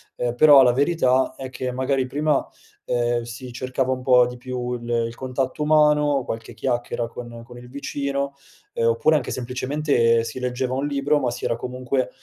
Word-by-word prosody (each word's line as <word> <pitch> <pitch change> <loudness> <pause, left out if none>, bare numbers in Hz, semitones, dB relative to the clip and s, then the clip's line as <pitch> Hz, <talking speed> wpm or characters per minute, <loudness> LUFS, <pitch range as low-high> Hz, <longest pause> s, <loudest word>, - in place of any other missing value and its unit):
ehm, 120 -1 -2
però 145 +1 +8
la 125 -2 +5
verità, 130 -3 +2
è 130 -1 -6
che 130 0 -4
magari 130 +1 0
prima, 145 +2 0 0.4
ehm, 120 0 0
si 120 +2 -8
cercava 130 +1 -1
un 130 - -6
po' 125 -1 +5
di 125 - -7
più 125 0 -4
il 120 -1 -6 0.2
il 115 - -9
contatto 130 +3 -3
umano, 150 -3 +3
qualche 115 0 -6
chiacchiera 120 -2 -2
con 120 0 -9
con 120 0 -13
il 125 0 -12
vicino, 140 0 -3 0.4
uhm, 115 - +1
oppure 115 +7 +3
anche 150 - -1
semplicemente 125 -2 +1
si 115 +3 -6
leggeva 125 0 -2
un 135 +2 -1
libro, 145 +1 +1
ma 125 -2 0
si 120 - -6
era 115 - 0
comunque, 125 +2 -2
130 Hz, 180 wpm, -23 LUFS, 120-140 Hz, 0.4 s, però